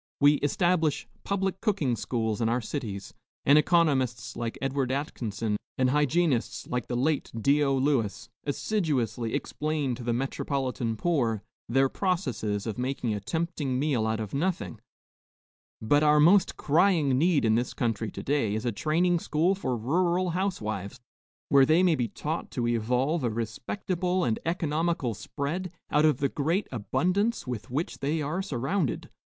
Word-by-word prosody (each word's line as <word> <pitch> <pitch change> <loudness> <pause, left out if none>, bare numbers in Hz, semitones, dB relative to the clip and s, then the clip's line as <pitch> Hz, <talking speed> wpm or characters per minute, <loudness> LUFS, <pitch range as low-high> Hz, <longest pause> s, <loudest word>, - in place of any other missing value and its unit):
We 145 +1 +6
establish 160 +1 +1 0.2
public 195 -1 -1
cooking 185 - +1
schools 115 -2 -2
in 115 - +2
our 120 +2 +1
cities, 110 -5 -5 0.3
and 140 - +6
economists 150 -7 +2
like 115 -1 -4
Edward 135 -1 -1
Atkinson 115 -6 -2 0.2
and 130 -1 +2
hygienists 150 -2 +1
like 125 -1 -3
the 120 - -2
late 140 +4 0
Dio 140 +3 +3
Lewis 130 -6 0 0.2
assiduously 140 - -1
explain 150 -3 -2
to 120 +1 -7
the 120 - 0
metropolitan 130 -2 -2
poor 120 - 0 0.3
their 135 +3 +4
processes 130 - -1
of 110 0 -4
making 125 -3 -1
a 105 - -2
tempting 155 - -2
meal 130 -6 +1
out 110 0 -1
of 110 -3 -5
nothing; 175 +6 -2 1.0
but 145 +7 +3
our 150 0 +5
most 180 +5 +5
crying 160 -3 +3
need 165 -4 +3
in 110 - +4
this 120 +3 0
country 115 -2 -1
to - - -7
day 135 -8 +1
is 110 +3 -3
a 120 - +1
training 170 - +1
school 165 +4 +1
for 130 -11 -2
rural 175 +9 +1
housewives, 120 - -3 0.5
where 140 -2 +6
they 160 +6 +4
may 180 -2 +4
be 125 -6 0
taught 155 +8 -4
to 120 -2 -2
evolve 125 +7 +1
a 120 - +2
respectable 180 - -2
and 110 -6 0
economical 165 -5 0
spread 155 - -4 0.2
out 150 +1 +4
of 155 - +4
the 140 - +1
great 165 +9 0
abundance 180 - 0
with 125 -2 -5
which 145 +7 -3
they 150 +4 0
are 155 +5 -2
surrounded. 145 - -2
140 Hz, 155 wpm, -28 LUFS, 120-165 Hz, 1.0 s, We